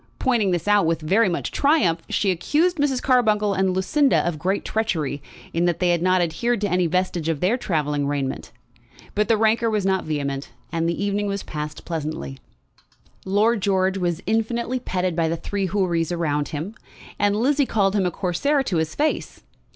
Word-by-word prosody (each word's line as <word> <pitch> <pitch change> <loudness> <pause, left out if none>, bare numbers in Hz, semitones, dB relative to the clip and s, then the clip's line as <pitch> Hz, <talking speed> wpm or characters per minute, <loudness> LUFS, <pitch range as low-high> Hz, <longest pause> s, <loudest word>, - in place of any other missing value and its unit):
Pointing 235 -7 +1
this 175 0 -1
out 205 -4 +4
with 165 -1 -1
much 190 +2 +1
triumph, 195 - +2
she 195 - +1
accused 310 - +1
Mrs. 280 -3 0
Carbuncle 215 -5 +3
and 190 0 +1
Lucinda 265 - +2
of 165 -3 -2
great 190 +4 -1
treachery, 160 -11 -1 0.3
in 170 +1 +1
that 175 -2 +1
they 180 - +1
had 170 -1 +1
not 185 0 +3
adhered 235 +8 -1
to 205 - +1
any 180 -1 +2
vestige 175 -1 -1
of 160 -3 -1
their 190 +9 +2
travelling 150 - -1
raiment. 140 -2 -3 0.6
But 210 +1 +1
the 225 - +3
rancour 225 +1 +2
was 210 -3 0
not 190 -1 +1
vehement, 140 -3 -3 0.2
and 165 0 0
the 170 +4 -2
evening 205 0 -1
was 200 0 -3
passed 150 0 -6
pleasantly. 150 - -4 0.9
Lord 210 +3 +2
George 190 0 +1
was 175 -1 -1
infinitely 235 +3 -1
petted 185 -7 -2
by 165 -1 +1
the 165 - -1
three 200 +2 -2
Houris 175 -4 0
around 150 -4 -1
him, 160 +7 -5 0.5
and 205 0 +2
Lizzie 270 +5 +2
called 200 -2 +1
him 190 -3 +2
a - - +1
Corsair 200 - 0
to 190 -9 -1
his 160 0 -1
face. 305 +1 -2
190 Hz, 180 wpm, -23 LUFS, 165-220 Hz, 0.9 s, out